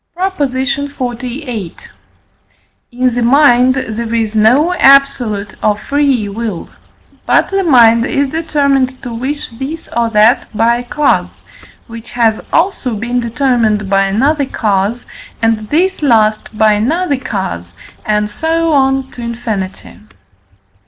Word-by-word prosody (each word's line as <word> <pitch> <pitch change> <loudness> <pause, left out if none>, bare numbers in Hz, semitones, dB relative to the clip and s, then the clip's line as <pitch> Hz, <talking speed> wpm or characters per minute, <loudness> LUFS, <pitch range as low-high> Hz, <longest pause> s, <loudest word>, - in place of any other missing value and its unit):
PROP. 375 +2 -2
XLVIII. 255 - -4 1.2
In 250 0 0
the 245 - -1
mind 255 0 +4
there 230 -2 -4
is 220 -1 -1
no 255 +11 +3
absolute 270 - +3
or 210 -1 +2
free 275 -1 0
will; 210 -3 -5 0.6
but - - +2
the 390 0 0
mind 235 -6 +5
is 275 -1 -1
determined 280 -5 0
to 245 -2 -6
wish 265 +5 -4
this 270 +7 -7
or 235 -1 +1
that 220 +2 +3
by 230 +2 +3
a 245 - -5
cause, 295 +4 -1 0.5
which 230 0 -11
has 230 -2 +1
also 325 - 0
been 240 +4 -2
determined 235 -4 0
by 195 0 +3
another 275 +8 +1
cause, 210 +1 -1 0.3
and 225 -2 -1
this 360 +5 0
last 220 -5 +1
by 215 -1 +4
another 285 - 0
cause, 190 - -5 0.3
and 210 0 -1
so 325 +6 0
on 270 -1 +1
to 245 - -10
infinity. 225 -6 -5
245 Hz, 125 wpm, -14 LUFS, 220-275 Hz, 1.2 s, mind